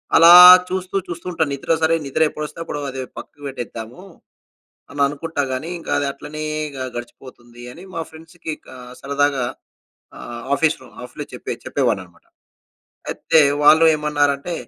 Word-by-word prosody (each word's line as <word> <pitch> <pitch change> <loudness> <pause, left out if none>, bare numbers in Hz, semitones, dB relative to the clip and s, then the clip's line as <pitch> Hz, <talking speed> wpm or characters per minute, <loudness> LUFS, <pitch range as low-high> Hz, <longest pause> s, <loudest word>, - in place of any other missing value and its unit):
అలా 165 +1 +8 0.4
చూస్తూ 185 +1 -4
చూస్తూ 170 0 -8
ఉంటాను. 160 -4 -1
నిద్ర 140 +4 -4
సరే 165 +1 +3
నిద్ర 140 +4 -2
ఎప్పుడొస్తే 150 +2 -7
అప్పుడు 150 -3 -5
అది 130 0 -6 0.2
పక్కకు 145 0 -11
పెట్టేద్దాము 120 +3 -8 0.9
అని 145 - -7
అనుకుంటా 145 +1 -3
గాని, 150 +6 -4
ఇంకా - - -8
అది 145 - -1
అట్లనే 150 +2 -8 0.3
గ - - -8 0.2
గడిచిపోతుంది. 120 0 -11
అని 175 +8 -13
మా 165 - -3
ఫ్రెండ్స్‌కి 160 0 -8
క - - -20 0.3
సరదాగా 140 -1 0 0.8
ఆహ్, 120 0 -8
ఆఫీస్‌లో 160 0 0 0.2
ఆఫ్లో - - -8
చెప్పే - - -5
చెప్పే - - -2
వాడ్నాననమాట. 90 -2 -5 0.9
అయితే 160 - +2 0.2
వాళ్ళు 160 +2 +6
ఏమన్నారంటే 145 +2 -1
145 Hz, 140 wpm, -20 LUFS, 135-165 Hz, 0.9 s, అలా